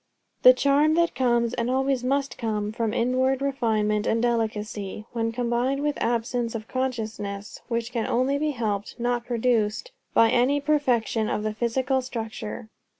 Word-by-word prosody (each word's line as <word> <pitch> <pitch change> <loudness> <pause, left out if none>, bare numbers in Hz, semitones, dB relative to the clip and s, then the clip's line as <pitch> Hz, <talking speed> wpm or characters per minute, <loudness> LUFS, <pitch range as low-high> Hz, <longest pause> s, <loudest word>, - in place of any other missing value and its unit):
The 255 - +9
charm 285 +4 +3
that 340 -1 +2
comes, 240 -2 +1
and 235 0 -1
always 265 0 +1
must 275 +2 0
come, 210 -2 -2
from 225 0 -1
inward 255 +3 +1
refinement 220 -6 0
and 230 - +2
delicacy, 215 -3 -2
when 230 -1 -1
combined 245 +4 0
with 295 -1 -1
absence 235 0 -1
of 220 0 -5
consciousness; 220 -6 -4
and - - -36
which 235 0 -2
can 230 -2 -2
only 265 +4 +1
be 305 +1 0
helped, 220 -5 -3
not 240 0 -1
produced, 235 - 0 0.2
by 225 0 +6
any 255 +4 +3
perfection 250 -7 +1
of 210 - -1
the 215 0 -1
physical 255 +4 0
structure. 225 -2 -6
235 Hz, 155 wpm, -25 LUFS, 220-260 Hz, 0.2 s, The